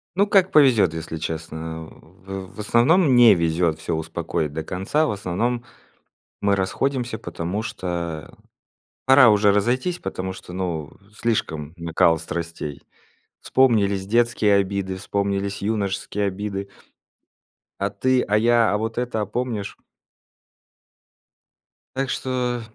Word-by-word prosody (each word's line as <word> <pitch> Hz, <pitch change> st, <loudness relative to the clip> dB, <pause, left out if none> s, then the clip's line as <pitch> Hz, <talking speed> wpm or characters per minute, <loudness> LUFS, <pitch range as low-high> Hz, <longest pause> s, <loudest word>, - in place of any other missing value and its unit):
Ну 200 Hz, +2 st, +4 dB
как 190 Hz, -2 st, +4 dB
повезёт, 120 Hz, -, +5 dB
если 80 Hz, 0 st, -5 dB
честно, 80 Hz, 0 st, -5 dB
а, -, -, -20 dB
в 95 Hz, +2 st, -10 dB
в -, -, -13 dB
основном 130 Hz, -, +4 dB
не 120 Hz, -4 st, +8 dB
везёт 85 Hz, -1 st, 0 dB
всё 80 Hz, -, -2 dB
успокоить 80 Hz, -1 st, -3 dB
до 80 Hz, +1 st, -3 dB
конца. 95 Hz, -, 0 dB
В -, -, -1 dB
основном 110 Hz, +5 st, -2 dB, 0.8 s
мы 100 Hz, -1 st, +2 dB
расходимся, 120 Hz, +5 st, -1 dB
потому 95 Hz, 0 st, -4 dB
что 85 Hz, -7 st, -5 dB, 0.7 s
пора 130 Hz, -2 st, +7 dB
уже 105 Hz, -1 st, +4 dB
разойтись, 125 Hz, -, 0 dB
потому 95 Hz, 0 st, -4 dB
что 90 Hz, -1 st, -11 dB
ну 85 Hz, -5 st, -3 dB, 0.2 s
слишком 80 Hz, -10 st, -2 dB
накал 85 Hz, 0 st, +2 dB
страстей. 80 Hz, -3 st, -5 dB, 0.6 s
Вспомнились 100 Hz, -7 st, +2 dB
детские 115 Hz, -1 st, +2 dB
обиды, 100 Hz, -1 st, -1 dB
вспомнились 100 Hz, +1 st, -2 dB
юношеские 100 Hz, -1 st, -1 dB
обиды. 100 Hz, 0 st, -4 dB, 1.1 s
А 100 Hz, 0 st, -1 dB
ты, 130 Hz, +5 st, +1 dB
а 105 Hz, -, +3 dB
я, 115 Hz, +1 st, +4 dB
а -, -, +2 dB
вот 110 Hz, +2 st, -4 dB
это, 120 Hz, -3 st, -1 dB
а -, -, -1 dB
помнишь? 115 Hz, -4 st, -3 dB, 2.2 s
Так 135 Hz, 0 st, -1 dB
что, 125 Hz, -2 st, -2 dB
100 Hz, 125 wpm, -23 LUFS, 90-120 Hz, 2.2 s, не